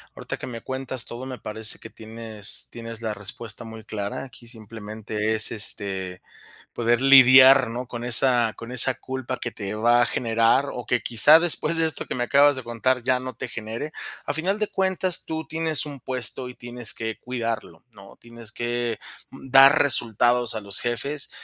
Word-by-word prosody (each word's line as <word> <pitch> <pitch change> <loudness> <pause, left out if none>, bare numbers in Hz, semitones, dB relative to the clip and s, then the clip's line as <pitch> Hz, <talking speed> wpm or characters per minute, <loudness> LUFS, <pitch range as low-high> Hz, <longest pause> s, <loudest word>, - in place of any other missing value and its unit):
Ahorita - - -7
que - - -8
me 115 -2 -8
cuentas 130 -2 -2
todo, 120 +2 -8
me 130 -1 -7
parece 110 0 -2
que 110 - -11
tienes 110 -2 -2
tienes 115 -1 -9
la 110 -2 -3
respuesta 105 +3 -6
muy 110 -1 -11
clara. 105 +2 -5
Aquí 120 -2 -16
simplemente 110 -1 -5
es, 110 - +5
este, 95 -4 0 0.5
poder 120 0 +1
lidiar, 130 -1 +7
¿no?, 125 +2 -6
con 120 -1 -7
esa 120 -1 +4
con 115 - -11
esa 125 +1 +5
culpa 130 -1 -6
que 120 - -5
te 105 -2 -7
va 120 +2 +3
a - - +2
generar, 115 +4 +1
o 125 - -7
que 125 - 0
quizá 145 +7 +6
después 165 -1 -1
de 165 - +2
esto 155 - -1
que - - -5
me 120 - -1
acabas 145 +2 +4
de 130 - -5
contar 120 +2 -1
ya 130 +1 +1
no 130 0 -7
te - - -7
genere. 115 +7 -7 0.3
A 145 - -2
final 185 +7 -1
de 210 - -1
cuentas, 190 -1 0
tú 160 0 -6
tienes 160 -2 0
un 140 -2 -9
puesto 125 0 -2
y - - -12
tienes 120 -2 -4
que 110 -1 -6
cuidarlo, 115 -2 -5
¿no?, 100 -2 -16
tienes 115 -1 -10
que 120 -1 -3 0.3
dar 135 +2 +4
resultados 120 -2 +1
a 110 - -4
los 100 -1 +1
jefes. 130 +4 -3
120 Hz, 185 wpm, -23 LUFS, 110-130 Hz, 0.5 s, lidiar